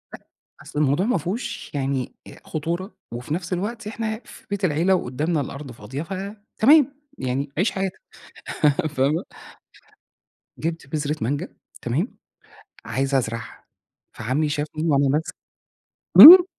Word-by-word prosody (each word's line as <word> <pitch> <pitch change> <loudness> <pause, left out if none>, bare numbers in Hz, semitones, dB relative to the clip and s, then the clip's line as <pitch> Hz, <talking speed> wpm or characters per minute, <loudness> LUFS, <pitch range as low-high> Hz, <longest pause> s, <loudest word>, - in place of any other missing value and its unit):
أ - - -11 0.4
أصل 150 - -5
الموضوع 150 +6 +2
ما 240 -5 +2
فيهوش 180 - -4
يعني 135 -2 -2 0.3
خطورة، 170 +6 -4 0.2
وفي 125 +5 -4
نفس 175 +1 -3
الوقت 210 +4 -3
إحنا 220 0 -3
في - - -14
بيت 200 -1 -1
العيلة 170 +4 +3
وقدامنا 150 +2 -1
الأرض 140 0 -7
فاضية 125 +7 -6
ف 190 - -7 0.4
تمام 285 +3 +6 0.2
يعني 135 +2 -2
عيش 190 +3 +2
حياتك. 195 -1 -3 0.9
فاهمة؟ 145 +3 +1 1.3
جبت 165 -2 -4
بذرة 150 +1 -2
مانجا، 145 +9 -2 0.3
تمام 145 - -2 0.7
عايز 135 +1 -1
أزرعها 115 -2 -3 0.5
فعمي 130 +7 -1
شافني 150 +1 -3
وأنا 140 -1 +3
ماسك 150 +4 -1 0.9
امم. 355 +3 +14
150 Hz, 125 wpm, -23 LUFS, 135-190 Hz, 1.3 s, امم